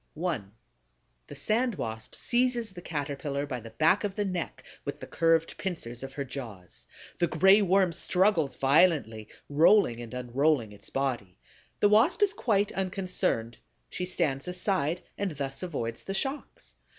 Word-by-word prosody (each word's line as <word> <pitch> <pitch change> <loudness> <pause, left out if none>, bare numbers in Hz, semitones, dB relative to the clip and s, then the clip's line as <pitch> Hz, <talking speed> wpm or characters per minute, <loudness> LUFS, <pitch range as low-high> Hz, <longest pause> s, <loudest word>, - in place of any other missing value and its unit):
1. 155 - -3 0.8
The - - -9
Sand 235 +1 +1
Wasp 110 -6 -5
seizes 240 -3 +1
the 175 - -9
Caterpillar 145 -2 -3
by 130 -4 -4
the 115 0 -10
back 160 - +2
of 200 -2 -2
the 205 - -1
neck 180 -3 -4 0.2
with - - -5
the - - -7
curved 165 -1 +1
pincers 125 -11 -4
of 135 0 -7
her 140 - -3
jaws. 115 -10 -9 0.3
The 175 - +3
Gray 190 +6 +5
Worm 190 -2 +3
struggles 175 -5 +1
violently, 135 -7 +3 0.2
rolling 150 - +4
and 115 -2 -8
unrolling 125 -1 0
its 100 0 -11
body. 125 -9 -2 0.4
The 205 - +5
Wasp 240 - +4
is 405 -1 +3
quite 205 - +1
unconcerned: 185 - -2 0.3
she 180 - -3
stands 155 -6 -1
aside 180 -2 -1 0.2
and 200 -4 -1
thus 135 -1 -4
avoids 130 -10 -4
the 195 - -4
shocks. 270 +8 -4
165 Hz, 150 wpm, -28 LUFS, 130-195 Hz, 0.8 s, Gray